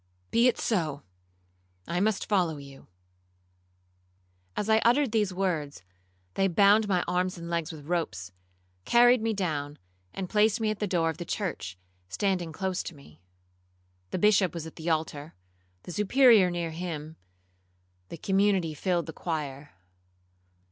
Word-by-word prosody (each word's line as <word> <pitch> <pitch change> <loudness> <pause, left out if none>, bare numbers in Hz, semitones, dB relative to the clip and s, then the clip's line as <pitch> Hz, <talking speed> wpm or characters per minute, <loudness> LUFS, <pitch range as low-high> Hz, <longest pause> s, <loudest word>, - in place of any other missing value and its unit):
Be 235 +2 +4
it 250 - +2
so, 155 -10 -1 0.8
I 175 - -1
must 210 +1 0
follow 180 -7 +1
you.' 140 -1 -13 1.7
As 210 - -1
I 220 0 +4
uttered 245 +3 +3
these 210 -4 +1
words, 165 - -2 0.5
they 195 - +2
bound 200 +4 +4
my 180 -3 +1
arms 180 +1 0
and 170 0 -7
legs 170 -2 -1
with 150 -3 -11
ropes, 150 - -3 0.5
carried 245 - +5
me 225 -1 0
down, 150 -6 -3 0.3
and 190 - -5
placed 215 +3 +2
me 220 -1 +1
at 215 - -5
the 210 - -1
door 165 -3 +1
of 160 - -11
the - - -3
church, 160 - -4 0.3
standing 180 - -1
close 185 +2 -2
to 170 - -8
me. 80 - -17 0.9
The - - -3
Bishop 190 -3 +3
was 165 -2 -5
at 160 - -10
the 160 +1 -4
altar, 155 -1 -2 0.5
the - - -8
Superior 210 - +5
near 170 -2 -3
him; 160 -2 -6 0.9
the - - -7
community 195 -2 +1
filled 175 +2 -1
the 160 - -7
choir. 150 -4 -5
180 Hz, 150 wpm, -28 LUFS, 160-205 Hz, 1.7 s, carried